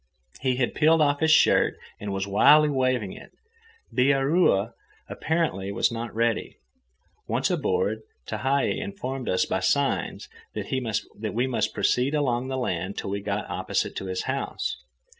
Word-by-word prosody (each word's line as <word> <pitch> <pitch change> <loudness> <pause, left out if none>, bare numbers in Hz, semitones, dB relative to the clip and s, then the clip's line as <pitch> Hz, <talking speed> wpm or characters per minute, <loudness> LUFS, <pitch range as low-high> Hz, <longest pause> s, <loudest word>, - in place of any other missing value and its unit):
He 130 -1 +1
had 125 -2 0
peeled 160 +2 +4
off 145 -1 +3
his 160 - +2
shirt 155 - +4 0.2
and 105 -1 -5
was 95 0 -2
wildly 150 +10 +6
waving 130 -7 0
it. - - -12 0.6
Bihaura 135 - +3 0.4
apparently 155 - -1
was 100 - +1
not 115 0 -4
ready. 115 -1 0 0.7
Once - - 0
aboard, 460 +1 0 0.3
Tehei 135 +6 0
informed 135 -11 -5
us 90 - +2
by - - -1
signs - - 0 0.3
that 120 -5 -2 0.4
we 120 +2 +2
must 130 -2 -1
proceed 130 +4 +1
along 130 -4 0
the 130 0 -3
land 95 -6 -2
till - - -4
we 100 0 -2
got 100 +1 -3
opposite - - -2
to - - -4
his 95 0 -3
house. 135 +1 -3
130 Hz, 145 wpm, -26 LUFS, 105-145 Hz, 0.7 s, wildly